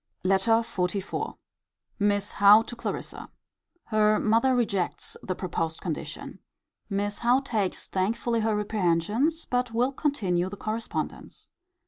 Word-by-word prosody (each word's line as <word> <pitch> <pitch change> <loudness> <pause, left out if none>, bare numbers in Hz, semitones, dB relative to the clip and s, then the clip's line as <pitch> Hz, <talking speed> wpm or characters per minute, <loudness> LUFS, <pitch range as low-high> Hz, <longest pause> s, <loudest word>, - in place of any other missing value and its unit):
LETTER 195 +5 +3
XLIV. 190 -1 -3 0.6
Miss 205 0 +1
Howe 205 +2 +7
to 240 - -8
Clarissa. 235 - -5 0.5
Her 215 -1 +3
mother 230 +4 +3
rejects 200 -7 -1
the 185 - -3
proposed 165 -3 -3
condition. 165 -5 -5 0.5
Miss 205 0 -2
Howe 245 +3 +3
takes 220 -8 -2
thankfully 230 +5 0
her 220 -1 +1
reprehensions: 210 - 0
but 245 -2 -1
will 250 +3 +2
continue 195 - 0
the 205 - -8
correspondence. 220 +3 -5
210 Hz, 115 wpm, -27 LUFS, 190-235 Hz, 0.6 s, Howe